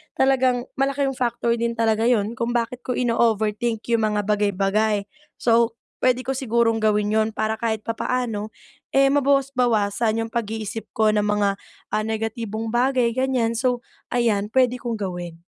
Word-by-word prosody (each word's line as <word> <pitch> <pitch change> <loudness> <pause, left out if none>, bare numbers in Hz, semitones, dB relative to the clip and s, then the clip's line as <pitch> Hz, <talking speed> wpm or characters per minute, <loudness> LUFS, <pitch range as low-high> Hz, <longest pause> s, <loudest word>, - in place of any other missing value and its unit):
talagang 260 -2 +2 0.2
malaking 275 0 +1
factor 245 -2 -1
din 235 0 -1
talaga 225 0 +2
yun 225 -1 +1
kung 235 +1 -1
bakit 240 +1 -1
ko 250 - 0
ino-overthink 225 -1 +1
'yung 225 -2 +3
mga 210 -1 0
bagay-bagay. 205 0 +1 0.3
So, 230 -1 +2 0.2
puwede 255 0 +2
ko 255 - -7
sigurong 235 -3 +1
gawin 210 -1 +1
yun 220 +1 +2
para 220 +1 -1
kahit 220 -1 -1
papaano, 225 -1 -2 0.4
eh, 275 0 +5
mabawas-bawasan 250 -6 +1
'yung 225 - -4
pag-iisip 225 -1 -4
ko 220 -1 +3
ng 210 -1 +2
mga, 205 -1 +1 0.3
ah, 215 - 0
negatibong 220 0 -3
bagay 245 +1 +2
ganyan. 250 -3 +1
So, 245 0 0 0.3
ayan 220 -4 +1
puwede 250 -1 +3
kong 240 -1 -4
gawin. 175 -3 -5
225 Hz, 145 wpm, -23 LUFS, 215-245 Hz, 0.4 s, eh